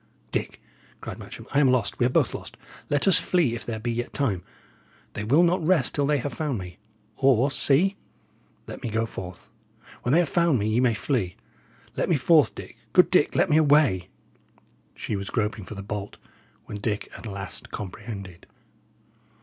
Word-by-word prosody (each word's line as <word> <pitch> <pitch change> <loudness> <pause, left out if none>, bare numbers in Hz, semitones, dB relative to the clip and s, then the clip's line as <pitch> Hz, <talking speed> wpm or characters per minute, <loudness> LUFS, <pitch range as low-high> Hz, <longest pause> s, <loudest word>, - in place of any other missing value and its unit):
"Dick," - - -3 0.4
cried - - -7
Matcham, - - -10
"I 140 - +3
am 140 -3 +5
lost; 120 -6 0
we 120 - +4
are - - 0
both - - +2
lost. - - -8 0.3
Let 145 +5 +1
us 190 - +7
flee 170 -10 +1
if 120 - -5
there 115 -2 -4
be 120 +2 -3
yet 120 +1 -4
time. 110 -11 0 0.7
They 105 - -4
will 140 +11 +4
not 175 0 +2
rest 160 -6 +2
till 145 -1 +1
they 150 0 +3
have 140 0 -4
found 145 -1 -2
me. 90 -1 -8 0.4
Or, 135 0 +3
see! 170 +9 +2 0.7
let - - -8
me - - -3
go 110 +1 0
forth; 90 -5 -8 0.5
when 120 - -1
they - - +6
have 170 - 0
found 170 -2 +2
me, 105 -1 -1
ye 110 +2 +2
may 125 -3 +3
flee. 115 - -1 0.6
Let - - -1
me 170 - +4
forth, 155 +1 +4
Dick - - -10 0.2
good 180 - +5
Dick, 180 -5 +3
let - - +3
me 155 -3 +3
away!" 140 - +4 0.9
She 105 - -4
was 100 0 -4
groping 105 -3 -2
for 110 - -8
the 100 - -7
bolt, 105 0 -5 0.5
when 105 - -7
Dick 105 -1 -3
at - - -8
last 100 -1 -5
comprehended. 100 -2 -8
120 Hz, 190 wpm, -25 LUFS, 105-145 Hz, 0.9 s, us